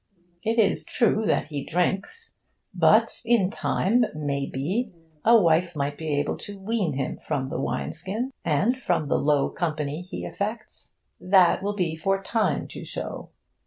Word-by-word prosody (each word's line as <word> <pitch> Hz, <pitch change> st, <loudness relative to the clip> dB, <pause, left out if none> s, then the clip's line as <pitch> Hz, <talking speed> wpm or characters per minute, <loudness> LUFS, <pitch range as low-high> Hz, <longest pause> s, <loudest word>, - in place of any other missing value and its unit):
It 225 Hz, +2 st, -1 dB
is 220 Hz, -3 st, +3 dB
true 220 Hz, -3 st, +1 dB
that -, -, +1 dB
he 145 Hz, -3 st, -4 dB
drinks. 195 Hz, -, -2 dB, 0.4 s
But -, -, +3 dB
in 225 Hz, -5 st, +3 dB
time, 230 Hz, +2 st, +1 dB
may 140 Hz, -2 st, -2 dB
be, 195 Hz, -, -2 dB, 0.3 s
a 230 Hz, 0 st, +7 dB
wife 170 Hz, -1 st, +2 dB
might 145 Hz, 0 st, -1 dB
be 150 Hz, -2 st, -1 dB
able -, -, -1 dB
to 205 Hz, -1 st, -9 dB
wean 195 Hz, -4 st, -1 dB
him 135 Hz, -1 st, -3 dB
from 135 Hz, -2 st, -1 dB
the 130 Hz, -, -3 dB
wine 125 Hz, -1 st, -2 dB
skin, 210 Hz, +10 st, -4 dB
and 220 Hz, -, +1 dB
from 155 Hz, -, 0 dB
the -, -, +2 dB
low 145 Hz, -1 st, +2 dB
company 155 Hz, -2 st, -2 dB
he -, -, -5 dB
affects. 215 Hz, +2 st, -5 dB, 0.3 s
That 185 Hz, -1 st, +4 dB
will 205 Hz, +1 st, -2 dB
be 175 Hz, -5 st, -1 dB
for 195 Hz, +5 st, 0 dB
time 215 Hz, +3 st, 0 dB
to -, -, -8 dB
show. -, -, -6 dB
185 Hz, 160 wpm, -25 LUFS, 150-215 Hz, 0.4 s, a